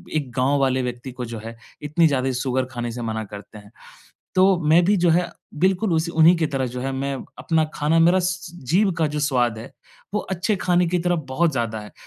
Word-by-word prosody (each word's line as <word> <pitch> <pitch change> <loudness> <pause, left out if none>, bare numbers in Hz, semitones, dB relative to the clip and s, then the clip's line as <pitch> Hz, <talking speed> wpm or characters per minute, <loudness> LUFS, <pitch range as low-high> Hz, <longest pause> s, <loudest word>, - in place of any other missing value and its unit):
एक 145 -5 -2
गाँव 135 +3 +2
वाले 130 -1 +1
व्यक्ति 125 +1 -5
को 125 0 -6
जो 115 -1 -7
है 115 0 -8 0.3
इतनी 155 +3 +3
ज़्यादा 135 -3 0
शुगर 130 0 0
खाने 120 -1 -4
से 120 +1 -6
मना 110 -1 -3
करते 105 +1 -11
हैं। 105 0 -15 0.6
तो 185 0 +5 0.2
मैं 170 +3 +5
भी 205 +3 +3
जो 175 - +4
है 175 +2 +2 0.3
बिल्कुल 190 +3 +2
उस 160 +1 +1
उन्हीं 165 +1 +5
की 165 -1 +1
तरह 135 -3 -2
जो 125 - -5
है 135 +2 -2
मैं 135 +1 -2 0.2
अपना 160 -1 +1
खाना 150 +2 +1
मेरा 175 +3 +5
स 180 -1 -3 0.2
जीभ 190 +3 +3
का 160 - +2
जो 150 0 -3
स्वाद 125 -6 +1
है, 110 - -10 0.4
वो 210 - +1
अच्छे 190 +3 -2
खाने 180 -1 +2
की 180 +1 0
तरफ 175 0 0
बहुत 160 +5 +1
ज़्यादा 115 -4 -2
है। 105 - -11
150 Hz, 225 wpm, -22 LUFS, 125-175 Hz, 0.6 s, तो